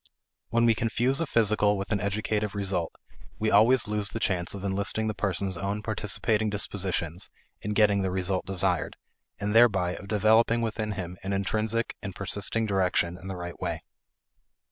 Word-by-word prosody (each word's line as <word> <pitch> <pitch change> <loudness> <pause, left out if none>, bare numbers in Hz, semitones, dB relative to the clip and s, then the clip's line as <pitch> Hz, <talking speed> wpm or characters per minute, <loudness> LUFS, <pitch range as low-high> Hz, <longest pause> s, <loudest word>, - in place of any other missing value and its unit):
When 115 0 +2
we 115 - +5
confuse 120 +6 +1
a 165 - -1
physical 105 -4 +2
with 100 +2 -5
an 105 - +1
educative 105 0 -1
result, 95 -4 -1 0.5
we 110 0 0
always 115 +4 +5
lose 105 -1 -1
the 115 - -5
chance 90 -3 0
of 100 - -7
enlisting 100 +3 0
the 110 - -1
person's 95 -2 -1
own 100 +4 -3
participating 110 0 0
disposition 95 -4 -1 0.4
in 105 - -3
getting 105 -2 +3
the 95 - 0
result 95 0 -1
desired, 95 -3 -1 0.4
and 105 +1 -2
thereby 100 -7 +4
of 100 - -10
developing 110 +3 +3
within 110 -1 -2
him 90 -2 -6
an 95 +1 -3
intrinsic 110 +4 0
and 100 -3 -6
persisting 100 +3 0
direction 90 -4 +1
in 90 +1 -11
the 95 - -4
right 85 0 -7
way. - - -3
100 Hz, 165 wpm, -27 LUFS, 95-110 Hz, 0.5 s, we